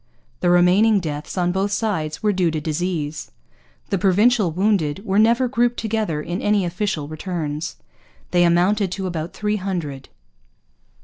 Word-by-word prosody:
The 175 - +1
remaining 185 +5 +4
deaths, 150 -1 -5
on 175 -1 +1
both 195 +2 -1
sides, 185 -8 -2
were 210 -1 +2
due 180 -3 +1
to 155 -1 -2
disease. 155 -1 -3 0.6
The 195 - +1
Provincial 205 +2 +3
wounded 190 -1 0
were 195 0 +2
never 235 +4 +4
grouped 240 -1 +1
together 215 -9 -2
in 175 +4 -4
any 205 -2 +2
official 175 -4 -2
returns. 155 -1 -4 0.6
They 175 -1 +4
amounted 180 +3 +2
to 195 0 -4
about 170 -2 -4
three 210 0 -1
hundred. 170 -9 -4
180 Hz, 145 wpm, -21 LUFS, 160-210 Hz, 0.6 s, remaining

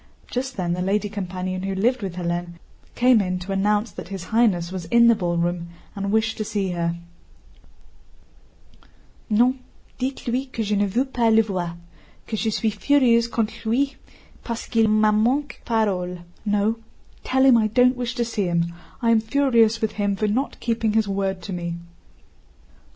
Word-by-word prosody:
Just 255 0 -3
then 175 -2 -1
the 180 - -2
lady 205 +3 0
companion 185 -2 -4
who 195 0 -3
lived 240 +6 +1
with 190 -3 -4
Hélène 175 -1 -3 0.4
came 245 -2 +5
in 185 -1 -1
to 180 +2 -6
announce 205 +2 +1
that - - -9
His 190 -2 -6
Highness 190 -6 +1
was 185 -3 -5
in 235 +6 +5
the - - +7
ballroom 175 -2 -1 0.3
and 200 0 -2
wished 220 +1 +1
to - - 0
see 200 -3 -2
her. 170 -1 -1 2.3
"Non, 245 +5 +3 0.4
dites 260 0 -3
lui 255 +3 -1
que 230 -3 -3
je 210 0 0
ne 205 0 +2
veux 235 +7 0
pas 240 -4 +1
le 225 0 +5
voir, 180 -5 -4 0.5
que 220 - -4
je 220 +1 0
suis 220 +1 0
furieuse 235 +2 +3
contre 230 -2 -1
lui, 265 +5 +1 0.5
parce 230 -1 -4
qu'il 225 -2 +2
m'a 215 0 +4
manqué 250 +7 +1
parole." 185 -6 0 0.3
"No, 210 +2 +1 0.4
tell 265 +1 +2
him 260 -2 +7
I 220 -1 +3
don't 250 +4 +4
wish 245 -1 -3
to 240 - 0
see 220 -4 -2
him, 170 -1 0 0.3
I 230 - +4
am 225 -1 +4
furious 230 -2 +2
with 220 - 0
him 205 -1 -1
for 215 +2 0
not 250 +7 -1
keeping 230 -2 0
his 220 -1 +2
word 195 -2 -2
to 190 - -5
me." 170 -1 -3
215 Hz, 175 wpm, -23 LUFS, 185-235 Hz, 2.3 s, the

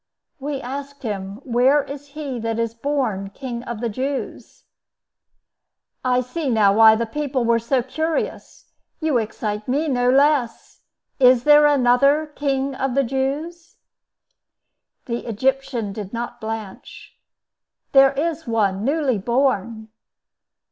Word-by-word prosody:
"We 280 0 -4
asked 280 +2 -7
him, 200 0 -5
Where 260 +4 +3
is 285 +1 -9
he 275 -5 -4
that 225 0 -2
is 230 -1 -1
born 230 -6 -2
King 245 -3 -5
of 235 -2 -6
the 240 - 0
Jews." 265 +5 -5 1.4
"I 250 -1 +2
see 275 +4 -4
now 210 -4 +4
why 220 +1 +7
the 230 +1 -1
people 270 0 -2
were 230 0 +3
so 245 +2 0
curious. 315 +5 -4 0.3
You 310 -6 +1
excite 210 -1 -4
me 290 +5 0
no 245 -3 +1
less. 275 -3 +1 0.4
Is 250 -2 +5
there 295 +1 +7
another 275 +2 +3
King 275 -1 -1
of 265 -1 -2
the 275 - +3
Jews?" 290 +7 -3 1.3
The 235 0 -4
Egyptian 240 -2 -1
did 200 -1 -7
not 240 +1 -5
blanch. 220 -3 -8 0.7
"There 270 0 +6
is 320 +2 -2
one 205 -4 0
newly 275 -4 +1
born." 230 -1 -1
255 Hz, 125 wpm, -21 LUFS, 230-280 Hz, 1.4 s, why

